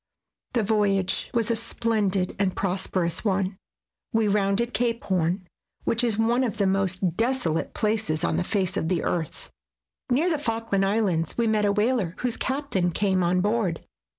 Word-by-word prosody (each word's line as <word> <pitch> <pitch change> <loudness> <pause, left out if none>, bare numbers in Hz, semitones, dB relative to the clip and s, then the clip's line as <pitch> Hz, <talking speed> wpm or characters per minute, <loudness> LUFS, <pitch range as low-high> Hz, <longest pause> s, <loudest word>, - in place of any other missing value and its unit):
The 235 -3 +2
voyage 200 -3 +1
was 230 -1 +1
a - - +2
splendid 215 -5 0
and 195 -2 +1
prosper 190 -1 -1
ous 170 0 -2
one. 190 -2 0 0.5
We 225 -1 +2
rounded 205 +4 +1
Cape 235 -1 0
Horn, 185 0 0 0.4
which 230 +2 +2
is 225 -4 +1
one 235 +3 +2
of 230 -3 -2
the 200 - +2
most 190 -2 0
desolate 225 -9 0
places 210 -8 0
on - - +1
the - - +1
face 190 0 0
of 160 - -1
the 175 -3 0
earth. 165 -3 -3 0.6
Near 275 +8 +2
the 310 - 0
Falkland 225 -6 0
Islands 195 -6 0
we 235 - +2
met 215 -1 +2
a 200 - +3
whaler, 210 -4 +1
whose 245 -2 -1
captain 260 -10 -1
came 190 +1 +1
on 180 +1 +2
board. 205 -5 0
205 Hz, 170 wpm, -25 LUFS, 185-230 Hz, 0.6 s, a